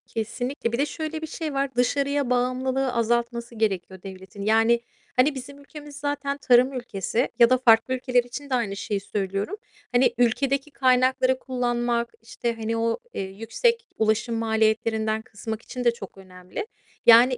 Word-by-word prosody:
Kesinlikle. 235 +3 -3
Bir 235 - -1
de 280 - +2
şöyle 315 +1 -5
bir 315 - -4
şey 310 -1 -4
var: 275 -1 -1
Dışarıya 280 +2 +1
bağımlılığı 255 +1 0
azaltması 235 0 -1
gerekiyor 190 -4 -2
devletin. 190 +1 -10
Yani 225 +3 +4 0.4
hani 275 +3 +3
bizim 280 +2 -8
ülkemiz 290 0 -11
zaten 285 -1 -2
tarım 255 -1 +4
ülkesi 240 -1 -2
ya 235 -1 +7
da 255 - +5
farklı 235 0 +4
ülkeler 250 -1 +2
için 245 +4 -8
de 260 - +1
aynı 220 -5 -1
şeyi 200 0 -2
söylüyorum. 195 - -3 0.4
Hani 245 0 +4
ülkedeki 270 +4 +1
kaynakları 255 0 +3
kullanmak 240 -2 -1
işte, 230 +1 -3
hani, 225 0 -2
o, 230 0 0 0.2
eee, - - -3
yüksek 230 - -1
ulaşım 220 +2 +1
maliyetlerinden 220 0 +1
kısmak 220 0 -6
için 250 +1 -6
de 240 - +5
çok 195 -5 -10
önemli. 185 - -8 0.4
Yani 240 +2 +7
240 Hz, 155 wpm, -25 LUFS, 220-265 Hz, 0.4 s, ya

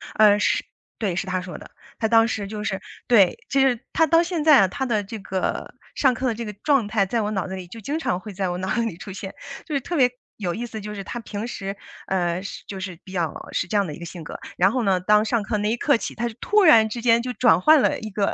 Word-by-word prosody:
呃， 210 -1 +6
是， - - +1 0.3
对， 195 -6 -1
是 190 - -2
他 185 0 -1
说 180 0 -7
的， - - -12 0.3
他 220 - +1
当 225 0 +5
时 205 -3 -3
就 210 0 -5
是 195 -2 -2 0.3
对， 210 - +5
其 275 - +2
实 250 -4 +3
他 325 - +4
到 330 +2 +5
现 340 -3 -2
在 305 -3 +7
啊， 190 - +4
他 265 +7 -3
的 215 -4 0
这 220 +3 -7
个 190 -1 -3 0.2
上 265 -3 +3
课 255 +2 -2
的 240 - +1
这 235 - -5
个 210 - -6
状 275 -8 +3
态， 205 -2 +1
在 230 +4 -1
我 210 0 -2
脑 195 -2 -2
子 190 - -5
里 185 -2 -8
就 225 +6 -10
经 285 +9 -3
常 180 - -1
会 210 +2 -9
在 190 -1 -2
我 175 - -3
脑 185 +1 -3
子 235 - +1
里 225 -8 -3
出 195 - -9
现， 190 0 -7 0.3
就 305 - -4
是 275 - 0
特 345 - -4
别 255 -5 +5 0.3
有 180 -5 -2
意 240 - -4
思， 220 -3 -7
就 210 +1 -6
是 200 - -5
他 240 - -6
平 220 0 -5
时， 195 -4 -5 0.3
呃， 180 -1 0
是 200 - -8
就 195 -2 -6
是 185 -3 -6
比 185 - -12
较 170 -5 -1 0.2
是 175 - -1
这 210 - 0
样 200 - +2
的 150 - -6
一 - - -10
个 170 - -7
性 170 -1 -8
格， - - -8 0.2
然 190 +3 +4
后 250 +1 0
呢， 190 -3 +2
当 210 +3 +4
上 220 -1 0
课 215 +1 -1
那 210 0 0
一 235 - 0
刻 285 0 +3
起， - - -6
他 235 +2 -1
就 235 - -6
突 420 -1 +3
然 225 -10 +7
之 235 +2 -5
间 230 0 +4
就 250 +1 -4
转 245 -5 +4
换 310 +2 +6
了 - - +1
一 220 - -6
个 200 -1 0
210 Hz, 310 characters per minute, -23 LUFS, 190-240 Hz, 0.3 s, 在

